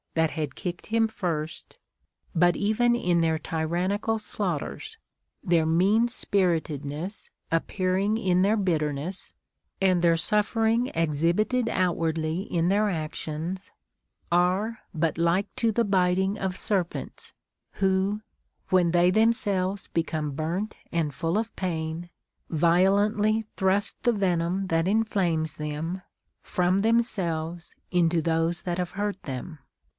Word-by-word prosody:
43 160 - +3
that 160 - -2
had 145 -4 -3
kicked 175 -3 -5
him 225 0 +2
first); 165 -7 -4 0.6
but 175 +1 +4
even 240 +4 +2
in 175 -7 +1
their 160 -1 +2
tyrannical 175 +8 -1
slaughters, 175 - -3 0.5
their 170 -2 +3
mean 195 +8 +3
spiritedness 170 - -1 0.2
appearing 185 +5 0
in 185 -5 +2
their 205 +4 +3
bitterness, 165 -2 -1 0.5
and 185 -2 +3
their 170 -1 +4
suffering 225 +6 +1
exhibited 170 - +1
outwardly 165 -2 0
in 170 -3 -1
their 205 +3 +3
actions, 160 +2 -4 0.6
are 185 +6 +2
but 160 -2 0
like 170 +4 +1
to 230 -1 +1
the 230 +2 +1
biting 190 +1 +2
of 190 -3 -3
serpents 185 -5 -2 0.5
λυΙιο, 195 +2 +1 0.5
when 180 -2 +3
they 175 +1 +4
themselves 200 -3 +2
become 160 -3 -1
burnt 170 +9 -3 0.2
and 160 -4 0
full 165 +7 -1
of 225 +1 -3
pain, 165 -1 -3 0.4
violently 200 +6 +3
thrust 190 +2 0
the 240 - +3
venom 190 -2 0
that 165 0 +1
inflames 180 -8 +1
them 155 +5 -4 0.4
from 180 +1 +1
themselves 175 -7 0 0.2
into 175 -1 +3
those 165 +1 0
that 175 0 -2
have 180 -1 -2
hurt 205 -1 -2
them. 145 +4 -6
180 Hz, 120 wpm, -26 LUFS, 165-205 Hz, 0.6 s, but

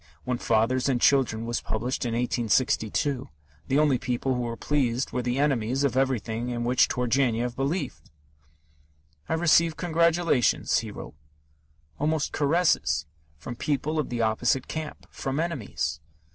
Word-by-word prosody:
When 125 -1 -2
Fathers 115 +4 +1
and 125 -3 +1
Children 120 -4 +3
was 120 0 -2
published 120 +4 -2
in 120 - -1
1862, 125 +2 0 0.4
the 135 - +2
only 145 -4 +3
people 125 +2 -1
who 125 - -1
were 115 -1 -4
pleased 130 -4 0
were 125 - -1
the 125 +1 -1
enemies 135 -2 +1
of 135 -4 +1
everything 120 -3 0
in 120 -1 -2
which 125 +1 +3
Turgenev 125 -1 0
believed. 135 - -3 1.2
"I - - +1
received 165 0 +3
congratulations," 170 -5 +2
he 115 - -6
wrote, 105 - -9 0.9
almost 155 0 0
caresses, 150 - +2 0.3
from 100 +11 -7
people 150 +4 -1
of 150 - -2
the 120 -1 -1
opposite 115 +4 +1
camp, 155 -1 -6
from 135 +2 -3
enemies. 160 - -2
130 Hz, 140 wpm, -26 LUFS, 120-145 Hz, 1.2 s, Children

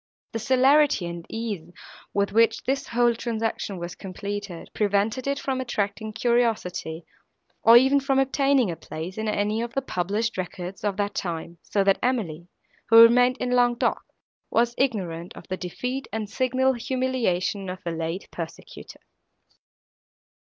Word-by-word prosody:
The 225 - -3
celerity 260 -1 +4
and 170 -1 -7
ease, 210 -8 -4 0.4
with 200 0 0
which 225 +1 +3
this 270 +1 -1
whole 240 0 +3
transaction 225 -4 -3
was 175 0 -5
completed, 200 -1 -6
prevented 210 +5 0
it 280 0 0
from 265 -2 -2
attracting 215 -2 -2
curiosity, 220 -9 0 0.6
or 230 +1 +8
even 265 +3 +5
from 270 -1 0
obtaining 270 -4 +2
a - - -4
place 165 +6 -7
in 220 - -2
any 210 +1 0
of 235 0 -5
the 270 - +1
published 205 +1 -2
records 180 +1 -6
of 205 -2 -1
that 205 0 -1
time; 170 -2 -4
so 200 - 0
that 195 0 +3
Emily, 180 -10 -1 0.4
who 225 0 +8
remained 245 +2 +7
in 250 0 -2
Languedoc, 245 -1 +2 0.5
was 235 +1 +2
ignorant 180 -10 -2
of - - -11
the 185 - -1
defeat 250 +10 -4
and 215 0 -3
signal 260 +3 +1
humiliation 235 -7 -1
of 185 +1 -7
her 170 - -1
late 165 +3 -4
persecutor. 165 -1 -9
220 Hz, 145 wpm, -25 LUFS, 185-250 Hz, 0.6 s, or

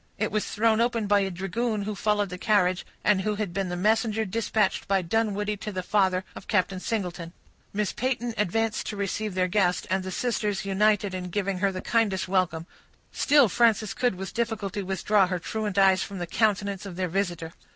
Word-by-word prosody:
It - - -1
was 215 - -1
thrown 225 +1 +2
open 235 -2 +1
by 205 0 +4
a 195 -1 0
dragoon 205 +4 -2
who 210 +1 -3
followed 205 0 0
the 180 0 -7
carriage, 185 -4 +2 0.2
and 205 -2 +3
who 210 +2 -1
had 205 -4 -3
been 195 -1 -2
the 175 - -3
messenger 220 +3 +1
dispatched 210 -1 0
by 195 -2 +2
Dunwoodie 210 +2 0
to 210 +1 -5
the 185 -2 -4
father 190 -1 +2
of - - -11
Captain 190 -2 +1
Singleton. 180 -5 -3 0.4
Miss 210 0 -1
Peyton 240 -2 -1
advanced 220 +2 0
to 210 - -4
receive 200 0 -2
their 185 -1 +2
guest, 180 -2 +1
and 190 0 +1
the 185 - -5
sisters 210 -2 -1
united 205 0 +2
in 180 -1 -4
giving 195 0 -2
her 195 0 +2
the 185 -1 -5
kindest 215 -6 +1
welcome; 180 -3 0 0.5
still 285 -4 +4
Frances 220 -1 +2
could 245 -5 0
with 190 +1 -6
difficulty 220 -3 -2
withdraw 195 +1 +2
her 180 0 -1
truant 210 +2 -4
eyes 190 -1 +5
from 200 - -5
the 175 - -3
countenance 200 0 0
of 185 - -8
their 185 0 -1
visitor. 175 -3 -2
200 Hz, 195 wpm, -26 LUFS, 185-215 Hz, 0.5 s, eyes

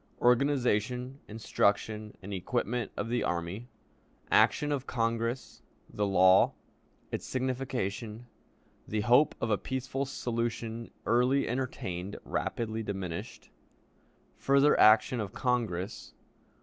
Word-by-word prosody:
Organization, 125 0 +1
Instruction, 105 0 -1
and 100 +2 -6
Equipment 120 +3 -2
of - - -2
the 120 +1 0
Army. 90 +7 -3 0.6
Action 150 0 +4
of 135 -2 -2
Congress. 115 +1 -2 0.3
The 105 -1 0
Law. 95 -1 +5 0.6
Its - - -3
Signification. 125 -4 -3 0.6
The 110 0 -1
Hope 125 +7 +4
of 115 - -1
a 105 - +2
Peaceful 130 +1 -3
Solution 115 -2 -3 0.2
early 125 +4 +3
entertained; 100 -7 -3
rapidly 110 -1 -2
diminished. 95 -5 -6 0.9
Further 140 +2 +4
Action 110 +3 +6
of 100 -3 -4
Congress. 110 -7 -2
115 Hz, 100 wpm, -30 LUFS, 105-125 Hz, 0.9 s, Action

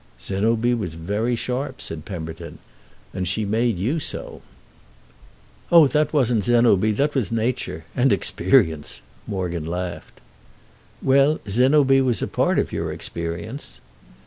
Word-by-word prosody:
"Zénobie 115 +5 0
was 95 -8 -4
very 105 +9 -1
sharp," 130 +3 -4
said 75 -2 -7
Pemberton. 85 -2 -7 0.6
"And 90 -1 -3
she 105 +4 -1
made 110 +1 +1
you 125 - -1
so." - - -5 1.3
"Oh 170 -3 +8
that 150 0 +1
wasn't 125 -7 +2
Zénobie; 115 -3 +3
that 145 +5 +1
was 125 -10 -1
nature. 115 -8 -2
And 130 +1 +3
experience!" 80 -6 +1 0.3
Morgan 85 -5 -3
laughed. 90 +1 -5 0.8
"Well, 140 +3 +4
Zénobie 135 +5 +4
was 125 -3 +1
a - - -1
part - - +1
of - - 0
your - - -3
experience." 85 - -6
110 Hz, 125 wpm, -22 LUFS, 90-130 Hz, 1.3 s, Oh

